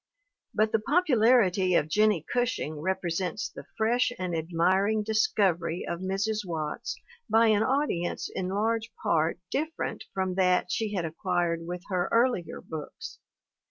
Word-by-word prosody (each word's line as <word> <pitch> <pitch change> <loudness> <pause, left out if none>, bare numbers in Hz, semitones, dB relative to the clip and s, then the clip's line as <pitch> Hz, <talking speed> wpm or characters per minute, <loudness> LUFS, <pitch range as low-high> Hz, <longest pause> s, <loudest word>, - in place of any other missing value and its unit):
But 215 0 +2
the 225 - +2
popularity 225 - +3
of 150 - +3
Jennie 210 -1 +2
Gushing 240 -11 -1
represents 185 +1 -2
the - - -11
fresh 235 +2 +2
and 180 -2 -2
admiring 185 +6 +1
discovery 190 -6 +1
of 170 - -3
Mrs. 195 +3 -1
Watts 160 -5 -4 0.3
by 225 0 +5
an 210 -1 +4
audience 255 -8 0
in 185 - -2
large 220 +3 -1
part 160 +1 +2
different 315 +3 -3
from 190 -1 -1
that 180 -1 +2
she 215 -2 -1
had 175 -3 -1
acquired 170 0 -1
with 180 0 -5
her 180 -2 0
earlier 230 -7 +1
books. 155 -2 -8
190 Hz, 135 wpm, -28 LUFS, 175-220 Hz, 0.3 s, by